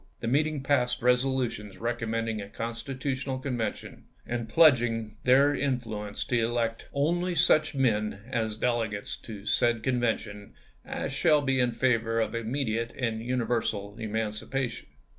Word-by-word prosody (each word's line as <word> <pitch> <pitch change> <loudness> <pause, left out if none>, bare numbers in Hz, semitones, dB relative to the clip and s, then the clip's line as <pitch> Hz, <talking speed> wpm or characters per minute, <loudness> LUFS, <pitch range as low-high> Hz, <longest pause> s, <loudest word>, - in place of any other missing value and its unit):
The - - -4
meeting 150 +2 +1
passed 125 -4 +1
resolutions 125 -4 +1
recommending 115 -2 -2
a 100 - -8
Constitutional 130 +4 -3
Convention 125 -4 -4 0.2
and 120 -1 -3
pledging 115 -9 +4
their 135 +3 +5
in 135 -2 +1
fluence 105 -4 -5
to 120 -2 +2
elect 115 0 -1
" - - -30 0.2
only 175 +1 -1
such 155 -1 +4
men, 110 -6 +1
as 110 -3 -1
delegates 110 -3 -1
to 105 -3 -10
said 115 0 +2
Convention, 115 -5 -1 0.3
as - - -4
shall 150 -2 +3
be 135 -1 +1
in 125 -1 +3
favor 115 -2 +1
of 110 - 0
immediate 115 -1 -1
and 115 -4 -1
universal 115 -4 -1
emancipation." 115 +3 -3
120 Hz, 135 wpm, -28 LUFS, 110-130 Hz, 0.3 s, their